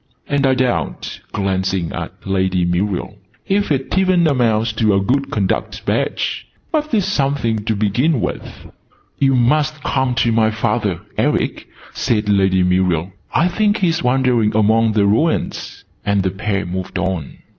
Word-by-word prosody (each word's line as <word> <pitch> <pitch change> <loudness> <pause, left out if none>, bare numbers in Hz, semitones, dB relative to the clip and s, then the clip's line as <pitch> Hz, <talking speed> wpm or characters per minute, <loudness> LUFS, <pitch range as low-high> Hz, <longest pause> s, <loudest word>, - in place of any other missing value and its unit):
"And 140 -1 +1
I 130 - +3
doubt," 125 -1 -2
glancing 95 -3 -1
at - - -7
Lady 95 -2 +1
Muriel, 95 +3 -2 0.3
"if 200 -2 0
it 135 -2 -1
even 185 -2 +3
amounts 115 -6 +2
to 110 -2 +2
a - - +3
good 135 +7 0
conduct 100 -6 -2
badge! - - -1 0.2
But 305 -2 -1
it's 210 -6 +2
something 135 - 0
to 110 - 0
begin 120 +9 +1
with." - - -5 0.5
"You 135 -1 +3
must 150 +4 +1
come 130 -2 0
to 115 0 +2
my 110 -1 +3
father, 110 +1 -1 0.2
Eric," - - 0 0.3
said 105 -3 0
Lady 95 -2 +3
Muriel. 90 -1 +1 0.2
"I 170 - +3
think 210 +3 +1
he's 170 -4 +1
wandering 125 -4 +2
among 110 +1 +3
the 105 -2 +3
ruins." 115 +12 0 0.2
And 100 -1 +1
the 95 - 0
pair 100 +1 -2
moved 90 +1 -4
on. 95 -6 -3
110 Hz, 150 wpm, -18 LUFS, 95-140 Hz, 0.5 s, I